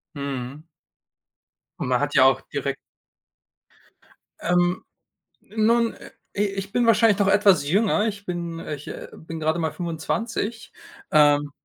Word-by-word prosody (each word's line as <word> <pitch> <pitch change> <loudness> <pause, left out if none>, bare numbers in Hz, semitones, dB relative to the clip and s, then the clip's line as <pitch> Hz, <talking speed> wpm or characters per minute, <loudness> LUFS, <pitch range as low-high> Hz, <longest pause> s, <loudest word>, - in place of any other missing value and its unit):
Mhm. 140 0 -5 1.2
Und - - -2
man 125 -1 +2
hat 145 0 -2
ja 130 - +7
auch 135 -1 +4
direkt - - -2 1.7
Ähm, 175 +1 +1 0.7
nun, 230 +1 +3
äh, - - -13 0.3
i 205 - +3
ich 195 0 -4
bin 240 +2 +2
wahrscheinlich 225 -2 +4
noch 200 - +3
etwas 195 -7 +4
jünger. 210 +5 +2
Ich 205 -2 -5
bin 170 -2 -4
ich, 150 -3 -7
äh, - - -7
bin 165 0 -8
gerade 160 +2 0
mal 160 -2 -1
25. 200 +7 -3 0.4
Ähm 145 -1 +4
175 Hz, 135 wpm, -24 LUFS, 145-205 Hz, 1.7 s, ja